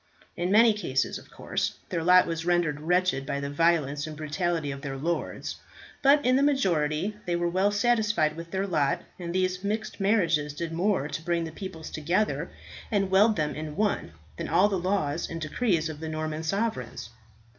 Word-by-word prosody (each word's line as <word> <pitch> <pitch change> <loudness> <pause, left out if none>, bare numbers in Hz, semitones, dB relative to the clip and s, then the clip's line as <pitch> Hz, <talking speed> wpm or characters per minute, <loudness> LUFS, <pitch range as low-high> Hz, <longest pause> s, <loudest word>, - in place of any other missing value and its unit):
In 175 +1 -1
many 225 +2 +6
cases, 135 -11 -1
of - - -18
course, - - -3
their 165 - -2
lot 180 +1 +6
was 165 -1 -3
rendered 175 -4 +1
wretched 180 -3 +1
by 140 +1 -3
the 140 0 -4
violence 150 -2 +1
and 155 -1 -7
brutality 155 0 -1
of 140 0 -7
their 135 -2 -5
lords; 165 +5 -3 0.4
but 285 +1 +5
in 255 +1 +4
the - - +3
majority 190 - +1
they 175 - +1
were 175 0 0
well 185 +4 +2
satisfied 210 -7 +2
with 165 +1 -8
their 190 +2 -1
lot, 155 -7 0 0.2
and 170 -1 -4
these 185 +1 0
mixed 215 +2 -3
marriages 170 -8 +2
did 165 +1 -4
more 180 -3 +1
to 155 - -5
bring 170 0 0
the 160 - -5
peoples 160 -2 -8
together 175 +8 0 0.4
and 195 -3 0
weld 210 +3 +5
them 150 -4 -1
in 155 0 -6
one, 205 - -1 0.2
than - - -4
all 180 +4 +5
the 200 - 0
laws 175 -4 -1
and 165 - -5
decrees 165 +1 0
of 155 -2 -7
the 160 0 -5
Norman 155 0 -3
sovereigns. 160 - -2
170 Hz, 190 wpm, -27 LUFS, 155-195 Hz, 0.4 s, many